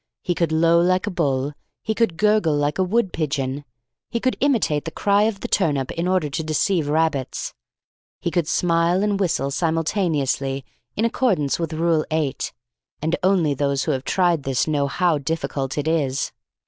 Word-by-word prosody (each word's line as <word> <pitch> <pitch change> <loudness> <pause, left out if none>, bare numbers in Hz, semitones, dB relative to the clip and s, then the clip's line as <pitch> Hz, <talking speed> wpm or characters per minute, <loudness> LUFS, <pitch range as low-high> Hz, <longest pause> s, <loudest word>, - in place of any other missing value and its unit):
He 180 - 0
could 170 -2 0
low 165 +1 +4
like 185 +3 +2
a 210 - -2
bull. 140 -5 0 0.3
He 220 - -1
could 220 -7 0
gurgle 210 -7 +3
like 145 +3 0
a - - +4
wood 195 +1 0
pigeon. 140 -3 -2 0.4
He 235 - -2
could 255 +2 0
imitate 230 - +1
the - - -2
cry 200 +5 +2
of 215 -3 -2
the - - -3
turnip 145 -8 +1
in 170 +2 -2
order 185 -4 +1
to 155 +3 -3
deceive 155 +1 0
rabbits. 155 -4 -1 0.7
He 170 - -2
could 170 -3 0
smile 170 +3 +2
and 205 -1 0
whistle 160 -7 0
simultaneously 155 -5 0 0.3
in 220 - +1
accordance 195 - +1
with 165 -1 -2
Rule 165 -1 +2
8 155 -4 -1 0.5
(and 160 +3 0
only 180 -6 +3
those 140 0 0
who - - 0
have 130 -1 -2
tried 175 -3 +2
this 135 -2 0
know 145 -3 0
how 170 0 +1
difficult 140 -2 -3
it 145 +1 -1
is). 140 -4 0
165 Hz, 175 wpm, -22 LUFS, 145-185 Hz, 0.7 s, low